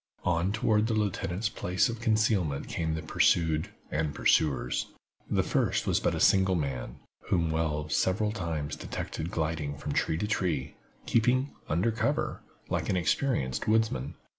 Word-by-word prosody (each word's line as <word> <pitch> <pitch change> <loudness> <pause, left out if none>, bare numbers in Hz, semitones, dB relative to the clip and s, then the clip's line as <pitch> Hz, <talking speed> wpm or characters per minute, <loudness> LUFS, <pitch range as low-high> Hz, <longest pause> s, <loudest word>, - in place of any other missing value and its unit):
On 90 +2 +1
toward 110 0 +2
the 115 - 0
lieutenant's 100 -1 -1
place 90 +1 0
of 115 -2 -4
concealment 110 -10 +1
came 80 -1 -2
the 80 - -4
pursued 80 -2 +2 0.2
and 75 -2 -1
pursuers. 65 -5 +2 0.4
The - - +2
first - - +1
was - - +2
but - - 0
a - - -3
single 95 -1 +4
man, 70 -7 -3 0.3
whom 85 -3 +1
Wells 80 -1 -1
several 105 +3 +1
times 80 -8 -3
detected 80 +2 -5
gliding 80 -4 -2
along 70 - -11
from - - -3
tree 80 - +1
to 105 - -1
tree, 90 -10 -1 0.3
keeping 130 +4 +2 0.2
"under 90 +9 +2
cover" 110 - -1 0.3
like - - -2
an 95 - +2
experienced 85 - 0
woodsman. 110 - +1
85 Hz, 155 wpm, -29 LUFS, 75-105 Hz, 0.4 s, single